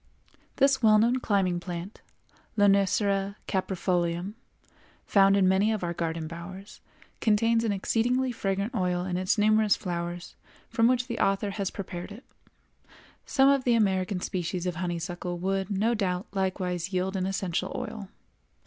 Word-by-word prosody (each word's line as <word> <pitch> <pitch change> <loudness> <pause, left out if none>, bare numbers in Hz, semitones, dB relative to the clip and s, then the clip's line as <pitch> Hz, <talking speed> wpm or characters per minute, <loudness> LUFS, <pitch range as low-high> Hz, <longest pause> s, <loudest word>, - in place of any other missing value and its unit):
This 275 -1 +3
well 215 -2 +6
known 235 +4 +3
climbing 190 -6 +1
plant, 175 +2 -7 0.6
Lonicera 200 0 +2
Caprifolium, 180 -1 -1 0.7
found 195 0 +4
in 190 -2 +4
many 195 +3 +3
of 215 -4 -2
our 170 0 -1
garden 165 -1 -3
bowers, 175 +5 -9 0.4
contains 225 +1 +2
an 225 - +1
exceedingly 245 +6 0
fragrant 200 0 -2
oil 180 -1 0
in 180 -1 -2
its 185 +4 +1
numerous 215 0 +4
flowers, 175 -1 -5 0.4
from 230 -1 +3
which 250 0 +2
the 235 -2 -5
author 195 +1 +1
has 195 -1 -2
prepared 180 -1 -7
it. 225 +6 -10 1.0
[Some 270 0 +4
of 275 -1 +4
the 245 -2 +3
American 190 -3 +1
species 180 -1 -3
of 180 -2 -2
honeysuckle 175 0 -3
would, 190 +1 -1
no 210 +4 +1
doubt, 185 -4 -1
likewise 185 -2 -2
yield 185 +1 -1
an 185 -1 -1
essential 190 -3 -2
oil. 200 -3 -6
195 Hz, 145 wpm, -27 LUFS, 180-215 Hz, 1.0 s, well